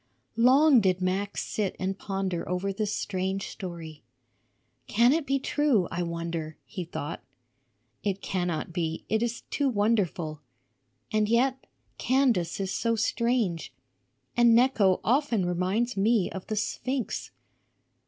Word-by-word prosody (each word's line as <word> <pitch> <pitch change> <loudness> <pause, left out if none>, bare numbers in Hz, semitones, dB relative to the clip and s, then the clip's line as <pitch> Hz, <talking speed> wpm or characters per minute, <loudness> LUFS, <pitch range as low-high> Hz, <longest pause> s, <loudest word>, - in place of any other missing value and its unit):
Long 260 +4 +6
did 185 -2 +2
Max 190 +2 -1
sit 205 -3 -2
and 190 +1 -2
ponder 195 -3 -3
over 185 +2 -1
this 210 +1 -2
strange 190 -1 -2
story. 170 -6 -8 0.9
"Can 235 +5 +4
it 320 -2 -1
be 275 - +2
true, 275 -8 +1
I 175 - -2
wonder?" 170 -2 -4
he 185 -5 -6
thought. 160 -1 -5 0.8
"It 200 -2 -1
cannot 175 -4 -2
be; 165 -1 -2
it 220 0 +1
is 235 -1 -2
too 285 -2 +1
wonderful. 200 - 0 0.7
And 215 -1 +2
yet, 260 +3 +1 0.3
Candace 245 -11 +2
is 190 -1 -2
so 230 +2 0
strange. 225 -5 0 0.6
And 235 -1 +6
Necho 230 -7 +4
often 240 -6 +2
reminds 185 +7 0
me 205 0 +2
of 190 - -7
the 215 - -2
sphinx. 250 +3 -2
200 Hz, 130 wpm, -27 LUFS, 180-235 Hz, 0.9 s, Long